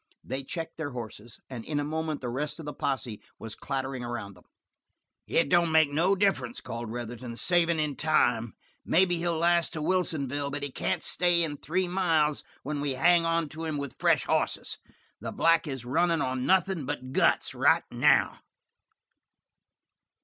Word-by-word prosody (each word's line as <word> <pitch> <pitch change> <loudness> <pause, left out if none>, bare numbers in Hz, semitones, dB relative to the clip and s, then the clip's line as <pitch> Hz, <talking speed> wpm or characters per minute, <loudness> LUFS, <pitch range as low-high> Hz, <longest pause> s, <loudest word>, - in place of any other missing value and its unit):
They 135 +1 -4
checked 165 +4 -6
their 145 -4 -4
horses, 115 -1 -8
and 125 -4 -7
in 150 +2 -2
a - - -1
moment 155 0 -3
the 125 - -3
rest 145 +5 -3
of 160 - -8
the 150 - -5
posse 125 -5 -3 0.2
was 115 -2 -8
clattering 135 0 -4
around 120 -4 -5
them. 90 - -20 0.8
"It - - +2
don't 170 +1 +3
make 160 -2 +4
no 175 +7 +2
difference," 190 - 0
called 115 0 -6
Retherton, 120 +1 -6
"savin' 170 0 +2
in 150 -2 -1
time. 120 -7 +1 0.3
Maybe 175 0 +3
he'll 170 -1 0
last 170 0 +2
to 160 - -4
Wilsonville, 145 -6 0
but 145 0 -4
he 145 - -3
can't - - -2
stay 175 -1 +3
in 150 -3 -2
three 180 +6 -1
miles 165 -5 +1 0.2
when 145 +1 -3
we 145 -2 -1
hang 170 +5 +4
onto 165 -1 -1
him 155 -2 -2
with 140 -3 -6
fresh - - +3
hosses. - - -1 0.4
The - - -5
black 165 0 +3
is 135 -4 -5
runnin' 165 +6 +2
on 130 -2 -1
nothin' 190 -5 +2
but 130 -3 -4
guts - - +2
right - - +3
now." - - +3
150 Hz, 170 wpm, -28 LUFS, 130-165 Hz, 0.8 s, make